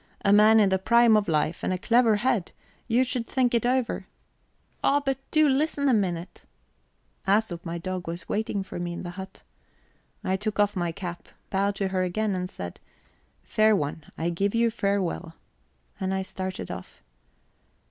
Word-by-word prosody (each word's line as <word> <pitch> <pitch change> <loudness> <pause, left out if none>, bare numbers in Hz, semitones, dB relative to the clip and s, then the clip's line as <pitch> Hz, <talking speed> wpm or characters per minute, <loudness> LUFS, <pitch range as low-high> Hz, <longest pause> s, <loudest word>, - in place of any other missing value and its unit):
A 200 - +5
man 215 +2 +7
in 205 -2 +5
the 190 0 +1
prime 235 +3 +5
of 210 -1 +2
life, 155 +1 0
and - - 0
a 185 - 0
clever 230 +2 +4
head 210 -4 0 0.3
you 245 +2 +3
should 250 -3 -3
think 250 -2 +1
it 235 0 +2
over." 255 -1 0 0.8
"Oh, 285 - +4
but 270 0 0
do 310 -1 +4
listen 285 +1 +1
a 260 - +4
minute 180 -4 -1 0.4
..." - - -34
Æsop, 195 -4 +1
my 170 0 -4
dog, 185 +1 -4
was 170 +1 -6
waiting 205 -2 -1
for 190 - -7
me 175 0 -3
in - - -6
the 175 - -5
hut. 190 +1 -9 0.8
I 190 - 0
took 210 +1 -3
off 205 0 +3
my 175 -2 -1
cap, 175 0 -7 0.2
bowed 200 +1 +1
to 195 -1 -1
her 190 -1 0
again, 200 +3 0
and 180 -1 -3
said: 90 - -7 0.6
"Fair 215 0 +3
one, 150 -2 -2
I 170 +2 -1
give 200 +5 0
you 230 0 +3
farewell." 195 -6 -1 0.6
And 190 -1 -1
I 190 - -1
started 185 - -5
off. - - -9
200 Hz, 180 wpm, -26 LUFS, 180-225 Hz, 0.8 s, man